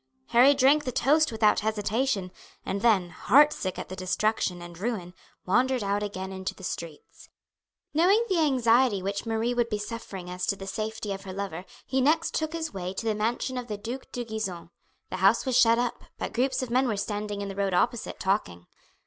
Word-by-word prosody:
Harry 260 +4 +6
drank 280 +3 +4
the 255 - -3
toast 300 +5 +3
without 215 -1 +3
hesitation, 215 -1 -1 0.3
and 200 - -2
then, 195 -7 +3
heartsick 275 -6 +3
at - - -5
the 185 - -7
destruction 185 0 0
and 175 0 -10
ruin, 195 -5 -3 0.3
wandered 250 +5 +2
out 200 +1 0
again 190 -2 -4
into 190 0 -4
the 190 - -14
streets. 165 -4 -7 0.6
Knowing 380 +9 +4
the 375 -5 +1
anxiety 245 - +3
which 200 +3 -3
Marie 225 +2 0
would 240 -1 0
be 210 - -1
suffering 205 -4 -7
as 180 0 -4
to - - +1
the 195 - -8
safety 215 +1 -4
of 195 - -7
her 190 -1 -7
lover 185 -3 -5 0.2
he 265 0 0
next 315 +5 +2
took 315 0 -1
his 320 -4 -4
way 185 -1 -5
to 225 - -4
the 220 - +2
mansion 235 +4 -1
of 245 - -7
the 210 -3 -4
Duke 240 +6 -7
de 245 -1 -4
Gisons. 195 -7 -5 0.4
The 185 - -3
house 195 +5 +4
was 260 -2 0
shut 230 -2 +6
up, 245 0 -2
but - - -4
groups 260 +2 0
of 245 - -6
men 255 +2 +3
were 215 -4 -1
standing 205 0 -3
in - - -4
the 195 - -6
road 195 -2 0
opposite 240 +4 0
talking. 190 - -1
215 Hz, 200 wpm, -27 LUFS, 195-250 Hz, 0.6 s, Harry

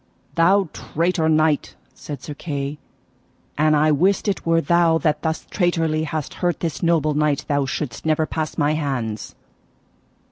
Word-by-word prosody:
Thou 185 +3 +4
traitor 165 0 0
knight, 155 -1 +2 0.2
said 145 -4 -8
Sir 150 - -6
Kay, 145 -1 -4 0.8
an 155 +1 +3
I 155 +1 +3
wist 185 +9 +2
it 195 -4 -2
were 165 0 +4
thou 170 -1 +3
that 155 -2 0
thus 160 -1 -2
traitorly 165 -4 +1
hast 155 -2 -4
hurt 175 -1 +1
this 165 -3 -3
noble 165 -3 +2
knight 150 -1 +1
thou 140 -2 +1
shouldst 130 0 -4
never 155 0 +1
pass 155 0 -4
my 145 -1 +2
hands. 130 -8 -3
155 Hz, 150 wpm, -22 LUFS, 150-165 Hz, 0.8 s, Thou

